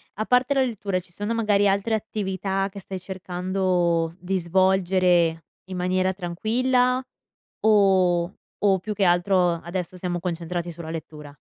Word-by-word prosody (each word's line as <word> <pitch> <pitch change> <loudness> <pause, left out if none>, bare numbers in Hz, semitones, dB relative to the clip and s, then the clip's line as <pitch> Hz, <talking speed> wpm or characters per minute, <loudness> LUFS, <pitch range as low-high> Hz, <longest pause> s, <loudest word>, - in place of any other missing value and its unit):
a 215 - -2
parte 250 +3 +3
la 270 - +3
lettura, 200 -6 -2
ci 175 0 -17
sono 205 +5 -3
magari 205 -3 +2
altre 200 +3 +1
attività 195 -2 -2
che 200 - -8
stai 190 0 -7
cercando 180 -2 -1
di 185 +1 -1
svolgere 180 -2 +2 0.2
in 185 -1 -6
maniera 185 +1 +1
tranquilla 250 +8 +1 0.6
o 190 -4 +3 0.3
o 195 -2 +4
più 210 +3 -4
che 200 -1 0
altro 175 0 +3
adesso 180 +1 -4
siamo 175 -1 -3
concentrati 175 0 -3
sulla 165 -1 -8
lettura? 150 -2 -8
185 Hz, 140 wpm, -24 LUFS, 175-200 Hz, 0.6 s, o